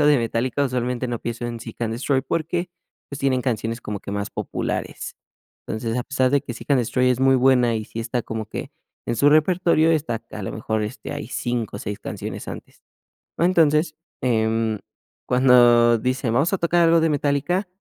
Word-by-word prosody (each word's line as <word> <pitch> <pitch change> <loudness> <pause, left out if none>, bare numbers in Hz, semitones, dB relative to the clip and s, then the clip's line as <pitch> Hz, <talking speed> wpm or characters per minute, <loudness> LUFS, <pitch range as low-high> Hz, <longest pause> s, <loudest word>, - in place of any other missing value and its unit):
algo 150 - +4
de 145 -3 +5
Metallica, 120 +4 0
usualmente 125 -1 -2
no 120 -1 -2
pienso 120 0 -4
en 120 -1 -5
Seek& 115 0 -9
Destroy 130 +3 0
porque, 170 +4 -2 0.4
pues, 140 - -7
tienen 130 -2 +1
canciones 115 -2 -2
como 105 -1 -5
que - - -8
más 100 0 -3
populares. - - -4 0.5
Entonces, 115 +1 -3
a - - -1
pesar 130 -2 +1
de 140 - +3
que 120 - -6
Seek& - - -11
Destroy 125 +1 +2
es 125 0 0
muy 135 0 +5
buena 125 -2 +4
y 110 - -4
sí 115 - -6
está 120 +1 -2
como 110 -1 -5
que - - -6 0.4
en 120 - -1
su 145 +5 +5
repertorio, 165 +1 +3
está 145 -8 -1
a 105 - -6
lo - - -4
mejor, 110 0 -2
este, 105 - -6
hay - - -5
5 120 -4 -3
o - - -6
6 100 0 -5
canciones - - -6
antes. - - -10 0.6
Entonces, 160 -2 +3 0.3
em, 110 -2 +1 0.5
cuando 120 -2 +5
dicen: 130 -1 -1
"Vamos 140 +8 +2
a - - +2
tocar 170 0 +3
algo 165 0 +5
de 165 - +3
Metallica", 150 +6 0
125 Hz, 190 wpm, -23 LUFS, 115-145 Hz, 0.6 s, de